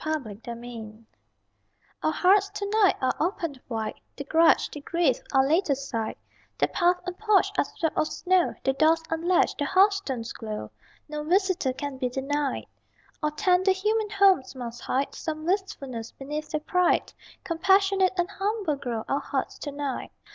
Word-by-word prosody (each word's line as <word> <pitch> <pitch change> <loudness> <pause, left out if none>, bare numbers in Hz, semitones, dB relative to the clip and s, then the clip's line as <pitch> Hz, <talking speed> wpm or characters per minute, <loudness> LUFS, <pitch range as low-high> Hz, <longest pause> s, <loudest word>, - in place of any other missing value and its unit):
_] - - -10
CHRISTMAS 235 -6 -4
EVE 225 -2 -9 1.0
Our 310 - +1
hearts 390 +4 +4
to 405 0 -4
night 415 -2 +4
are 260 - +1
open 330 -6 -2
wide, 220 -2 -4
The 280 - -5
grudge, 320 +4 +4
the 295 - -7
grief, 320 -4 +1
are 270 -1 +4
laid 325 +4 +2
aside: 265 -5 -2 0.4
The - - +2
path 355 -1 +2
and 360 -1 -4
porch 425 -2 +3
are - - +3
swept 320 -2 -3
of 310 - +2
snow, 365 +1 +1
The 270 - +2
doors 320 +3 +3
unlatched; 340 +2 +2
the 290 - +1
hearthstones 375 - +2
glow 215 - -6 0.4
No 300 0 -4
visitor 365 -4 +2
can 270 0 -5
be 250 -2 0
denied. 275 +2 -2 0.6
All 300 - +1
tender 370 +3 +3
human 425 +3 0
homes 390 -11 +3
must 240 -2 -7
hide 270 +2 -1
Some 310 -1 -5
wistfulness 275 - -3
beneath 300 +3 -5
their 305 - -2
pride: 360 +3 +1 0.3
Compassionate 385 +2 +3
and 350 0 +1
humble 395 -5 -1
grow 240 -5 -3
Our 275 - +1
hearts - - -3
to 290 - -5
night. 280 -2 -4
310 Hz, 160 wpm, -26 LUFS, 265-375 Hz, 1.0 s, hearts